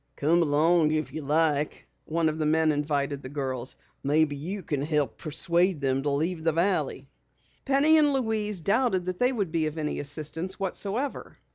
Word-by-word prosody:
"Come 165 +4 +2
along 160 +1 +3
if 155 -3 -1
you 155 - -4
like," 150 0 0 0.2
one 165 +1 0
of 155 0 -2
the 155 - 0
men 160 0 +3
invited 145 -1 -1
the 130 - -8
girls. 130 -3 -4 0.3
"Maybe 145 +1 +2
you 180 +7 -5
can 145 -3 -2
help 150 -4 -1
persuade 170 +3 +1
them 135 -1 0
to 145 - -1
leave 160 +4 -1
the 165 - +3
valley." 180 +4 0 0.6
Penny 295 +3 +4
and 295 -1 +4
Louise 220 -7 -1
doubted 200 -1 +1
that 185 0 -4
they 250 +1 +3
would 200 -9 -2
be 160 -1 +1
of 155 +1 -6
any 150 -1 -2
assistance 155 +5 -4
whatsoever. 205 +7 -3
160 Hz, 175 wpm, -27 LUFS, 145-190 Hz, 0.6 s, Penny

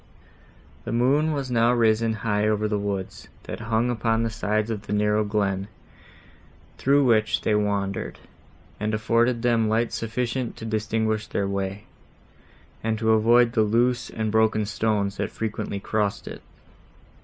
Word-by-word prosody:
The - - -5
moon 135 +7 +2
was 140 -4 -3
now 115 0 +3
risen 115 -1 +2
high 105 -1 +1
over 105 0 +1
the 105 -1 -1
woods, 100 -2 -4 0.2
that - - -7
hung 115 +2 0
upon 115 -1 0
the 115 - -1
sides 110 0 -1
of 105 -2 -5
the - - -3
narrow 105 +1 +2
glen, 100 -2 -1 1.1
through 140 +1 +4
which 110 -3 +2
they - - +1
wandered, 100 -2 -1 0.6
and 110 +1 -1
afforded 115 +2 +1
them 115 -2 +2
light 115 +2 0
sufficient 120 +2 -3
to 115 - -7
distinguish 110 0 -1
their 100 - -1
way, 100 +1 -3 1.0
and 110 0 0
to 110 0 +1
avoid 115 +2 +4
the 115 - +2
loose 120 +3 +1
and 110 -1 -3
broken 110 -1 +2
stones, 105 -2 -1
that - - -2
frequently 105 -2 -4
crossed 105 0 -2
it. - - -8
110 Hz, 150 wpm, -24 LUFS, 105-115 Hz, 1.1 s, through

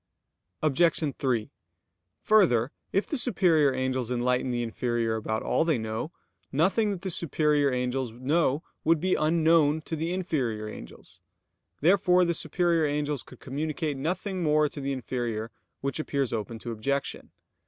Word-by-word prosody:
Obj. 155 0 +2
3: 125 -3 -1 0.7
Further, 145 - +4 0.2
if 195 - +1
the 295 - 0
superior 170 - +3
angels 130 -2 -1
enlighten 125 +1 0
the 120 -1 -1
inferior 115 -1 -1
about 110 0 -2
all - - +2
they 160 -4 +1
know, 110 +6 -4 0.4
nothing 190 +9 +2
that 195 -2 -4
the 190 - -3
superior 150 -3 +1
angels 125 0 -1
know 140 +4 0 0.2
would 165 0 +3
be 185 +3 +1
unknown 160 -1 +3
to 160 - -4
the 165 +2 -2
inferior 130 -13 -2
angels. 85 - -11 0.6
Therefore 180 +2 +4
the 170 - +1
superior 170 -2 +1
angels 145 -2 -1
could 130 - -15
communicate 150 +2 -3
nothing 180 +6 -2
more 150 -1 +3
to 145 - -7
the 140 0 -2
inferior; 120 -4 -3 0.3
which 140 +3 -2
appears 140 -5 -1
open 115 +1 -3
to 120 +1 -6
objection. 140 +5 -3
145 Hz, 145 wpm, -27 LUFS, 125-165 Hz, 0.7 s, Further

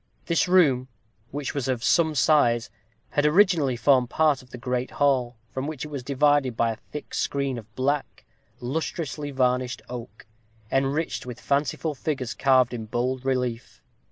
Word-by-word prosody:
This 170 +1 +2
room, 145 -9 +4 0.4
which 145 -1 -4
was 140 -3 -2
of 125 -3 -1
some 160 0 +3
size, 120 -6 +3 0.4
had 145 - +1
originally 155 -4 +4
formed 125 0 +3
part 155 -4 +2
of 125 - -19
the 125 - -8
great 125 +1 -2
hall, 130 -4 +1 0.2
from 130 +2 -3
which 155 -2 -5
it - - -8
was 140 -3 -5
divided 140 -2 +2
by 115 -1 +2
a - - -4
thick 145 +5 -10
screen 140 -3 -1
of 110 0 -16
black, 140 +2 -2 0.3
lustrously 150 +2 -3
varnished 125 -2 0
oak, 115 -4 -8 0.5
enriched 135 +1 0
with 125 -1 -7
fanciful 145 +2 0
figures 135 -4 -3
carved 130 -2 +3
in 115 -2 -4
bold 125 +3 -1
relief. 125 -3 -2
130 Hz, 155 wpm, -25 LUFS, 125-145 Hz, 0.5 s, room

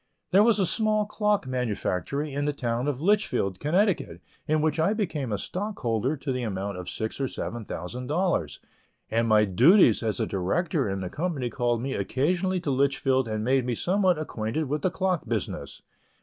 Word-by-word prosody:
There 195 - +6
was 220 -1 +4
a 195 - +2
small 215 +2 +1
clock 210 -3 0
manufactory 130 +3 -2
in 145 +1 -1
the 145 - 0
town 120 -1 -2
of 140 -2 -2
Litchfield, 185 - +1
Connecticut, 185 +6 +1 0.3
in 155 0 +2
which 155 0 +1
I 165 +6 +3
became 160 - -2
a 105 - 0
stockholder 145 - -2
to 135 0 -3
the 130 -1 -2
amount 100 -3 -3
of 90 - -6
six 110 +5 -4
or 135 - +1
seven 120 -2 -5
thousand 120 +11 -6
dollars, 150 - 0 0.5
and 115 +1 +2
my 105 -1 +5
duties 125 - +5
as 110 -2 -1
a - - +1
director 130 - 0
in 95 0 -3
the 90 - -4
company 150 -8 -2
called 120 -1 0
me 135 0 -2
occasionally 180 +7 0
to 150 - -1
Litchfield 135 -1 +1
and 110 -1 -2
made 130 +2 +2
me 120 -1 -1
somewhat 185 - +2
acquainted 120 -2 -3
with 150 +2 -2
the 185 - +2
clock 185 -2 -1
business. 110 -5 -4
135 Hz, 185 wpm, -26 LUFS, 115-175 Hz, 0.5 s, There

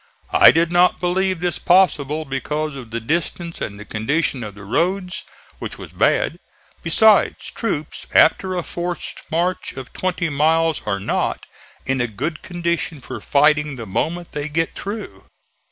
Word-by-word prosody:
I - - +9
did 165 +1 +2
not 180 +1 +4
believe 185 0 0
this 175 -1 -1
possible 160 -5 +3
because 150 +2 -3
of 125 -4 -8
the 115 +1 -3
distance 170 +6 -2
and 100 0 -4
the 105 - -9
condition 125 +5 -1
of 105 -2 -7
the 100 - -11
roads, 180 - -1 0.4
which - - -6
was - - -10
bad; - - +2 0.4
besides, 220 -2 +3
troops 155 -10 -3
after 185 -1 +4
a 175 - -1
forced 175 0 -4
march 175 +3 -1
of 130 -1 -9
twenty 180 -2 -1
miles 160 +2 +2
are 100 -1 0
not 100 - -1 0.4
in 135 -1 0
a 120 - +1
good 150 +9 -4
condition 170 -3 -2
for 125 - -8
fighting 150 0 +3
the 115 -3 -7
moment 170 - -2
they 150 +1 -4
get 165 +2 0
through. 195 - -7
160 Hz, 155 wpm, -21 LUFS, 135-175 Hz, 0.4 s, I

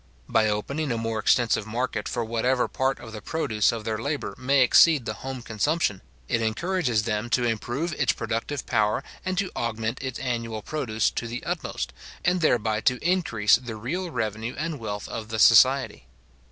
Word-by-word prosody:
By 110 -1 +3
opening 135 +8 -2
a 115 - 0
more 115 -1 -2
extensive 110 -1 +2
market 125 +4 -2
for 120 -2 -2
whatever 125 +3 +1
part 135 +1 -1
of 115 -2 -10
the 110 -1 -7
produce 110 -5 +1
of 115 -2 -5
their 110 0 -2
labour 145 +5 -3
may 135 +1 +3
exceed 145 +1 +6
the - - -2
home 130 -2 -5
consumption, 110 - 0 0.3
it 115 - 0
encourages 120 - 0
them 110 +1 -2
to 120 +2 +2
improve 120 +8 -1
its 140 -4 +2
productive 115 +5 -3
power, 110 +3 +1 0.2
and 185 0 -2
to 195 -1 0
augment 115 +1 -2
its 130 -2 -4
annual 115 -4 -3
produce 115 -8 -1
to 120 - -4
the 120 +2 -5
utmost, - - -3 0.3
and 180 0 +2
thereby 110 -7 +2
to 125 +3 +2
increase 115 - +3
the 120 -3 -7
real 165 - -3
revenue 110 -3 -3
and 160 -3 -3
wealth 105 -2 -5
of 110 -1 -6
the 110 - -3
society. 120 - +5
120 Hz, 180 wpm, -25 LUFS, 110-135 Hz, 0.3 s, exceed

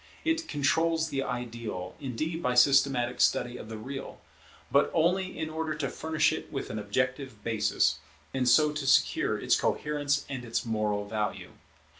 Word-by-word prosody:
It 325 0 0
controls 160 +2 +1
the 135 -2 -1
Ideal, 115 -7 -5
indeed, 155 +5 -3
by 125 -6 0
systematic 125 -1 +4
study 120 0 +2
of 110 - -9
the 110 - -6
Real; 135 +5 -7 0.5
but 140 +1 +4
only 185 +3 +1
in 160 0 -2
order 160 -1 -2
to 145 -3 -2
furnish 160 0 +1
it - - -6
with - - -4
an 110 - -3
objective 125 +2 -2
basis, 110 -2 +1 0.3
and 125 -2 +2
so 150 +5 +5
to 150 -2 -4
secure 130 - +3
its - - +2
coherence 145 -1 0
and 130 -3 -5
its 115 -1 -2
moral 105 -2 -1
value. 105 -1 -3
135 Hz, 160 wpm, -29 LUFS, 115-150 Hz, 0.5 s, so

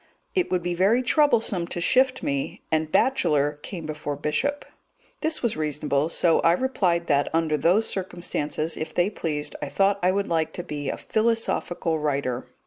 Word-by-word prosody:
It 370 -3 +1
would 180 -2 0
be 175 0 -1
very 200 +8 +3
troublesome 235 - +2
to 175 - -4
shift 260 +7 +2
me, 140 -1 -3
and 155 0 0
bachelor 150 - +2
came 170 -1 -7
before 150 -1 -4
bishop. 155 - -1 0.5
This 315 -3 -2
was 235 - +1
reasonable, 150 -1 -1
so 170 -1 +3
I 165 - +4
replied 180 -7 +1
that, 145 -2 +2
under 160 -2 +2
those 175 +9 +3
circumstances, 170 -4 -3
if 155 - -5
they 180 +4 +2
pleased, 150 -6 -3
I - - -2
thought 195 0 +2
I 180 - +3
would 200 +2 0
like 160 -2 0
to 175 - -5
be 145 -3 -4
a - - -3
philosophical 220 -7 0
writer. 135 -4 -2
170 Hz, 170 wpm, -25 LUFS, 150-205 Hz, 0.5 s, I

